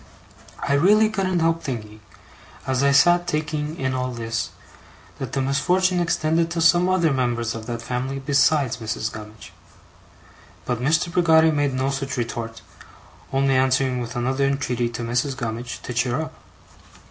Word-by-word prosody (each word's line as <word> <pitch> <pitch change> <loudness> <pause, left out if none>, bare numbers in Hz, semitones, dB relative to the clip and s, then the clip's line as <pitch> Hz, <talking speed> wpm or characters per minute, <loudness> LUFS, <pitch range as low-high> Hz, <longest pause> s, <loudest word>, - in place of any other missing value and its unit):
I 140 - +2
really 210 +9 +4
couldn't 185 -4 0
help 165 0 +1
thinking, 110 -5 -6 0.7
as 130 -1 0
I 140 0 +4
sat 175 +5 +4
taking 150 -1 -2
in 130 -1 -1
all 130 0 -2
this, 115 -1 -3 0.7
that - - -5
the 135 - 0
misfortune 180 +7 +1
extended 165 -1 +1
to 170 0 -3
some 175 +2 +4
other 170 -5 +2
members 120 -3 -1
of 115 0 -8
that 115 -1 -4
family 130 +3 -3
besides 140 0 +2
Mrs. 110 0 -3
Gummidge. 105 0 -11 1.1
But 125 -1 -2
Mr. 160 +5 +1
Peggotty 160 -2 +5
made 145 -3 0
no 130 +1 0
such 135 -1 -4
retort, 115 -1 -4 0.7
only 135 0 +2
answering 130 -1 +2
with 120 +1 -6
another 130 +3 0
entreaty 125 -4 -1
to 120 0 -5
Mrs. 125 +3 -1
Gummidge 120 +1 -5
to 125 - -5
cheer 125 +3 0
up. 160 0 -5
135 Hz, 155 wpm, -23 LUFS, 120-160 Hz, 1.1 s, Peggotty